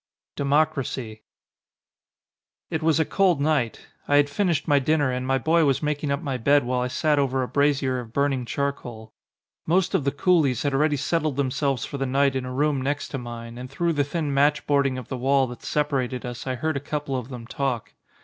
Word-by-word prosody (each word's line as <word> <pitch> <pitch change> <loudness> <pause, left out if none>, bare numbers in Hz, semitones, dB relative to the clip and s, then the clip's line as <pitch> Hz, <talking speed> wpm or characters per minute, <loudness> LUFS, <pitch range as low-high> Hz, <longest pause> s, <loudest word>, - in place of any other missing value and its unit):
139 145 +2 +3
XXXVI - - -18
DEMOCRACY 125 -7 -6 1.5
IT 160 - -1
was 160 0 +2
a 160 - +3
cold 185 -4 +2
night. 140 -6 0 0.2
I 145 - +3
had 145 0 +4
finished 175 -1 0
my 145 -1 +4
dinner, 145 -1 +1
and 125 0 -3
my 135 0 +2
boy 160 +5 +3
was 140 +1 +1
making 150 0 -1
up 140 +3 -1
my 135 -4 -2
bed 140 +4 +3
while 125 +1 -1
I 125 - 0
sat 150 +3 +1
over 135 -1 +1
a - - -3
brazier 140 -2 +1
of 115 -2 -9
burning 140 0 0
charcoal. 120 -4 -4 0.5
Most 175 +2 +2
of - - +2
the 140 - +1
coolies 145 -5 +2
had 140 -1 0
already 145 +2 +2
settled 155 0 0
themselves 135 -1 0
for 140 - -6
the 135 - -1
night 135 +1 +2
in 130 -1 -2
a 125 - -5
room 140 +1 +1
next 145 +2 -2
to 135 - -4
mine 120 0 -8
and 125 +1 -7
through 170 +5 0
the 145 -2 +1
thin 145 0 -2
matchboarding 140 -1 +2
of 125 - -7
the 130 - -4
wall 135 +2 +3
that 125 -1 -9
separated 135 -4 -1
us 120 +1 -6
I 130 - -1
heard 155 +4 -2
a - - -1
couple 145 -1 -3
of 125 -1 -4
them 125 -3 -8
talk. 125 -2 -3
140 Hz, 215 wpm, -24 LUFS, 130-150 Hz, 1.5 s, had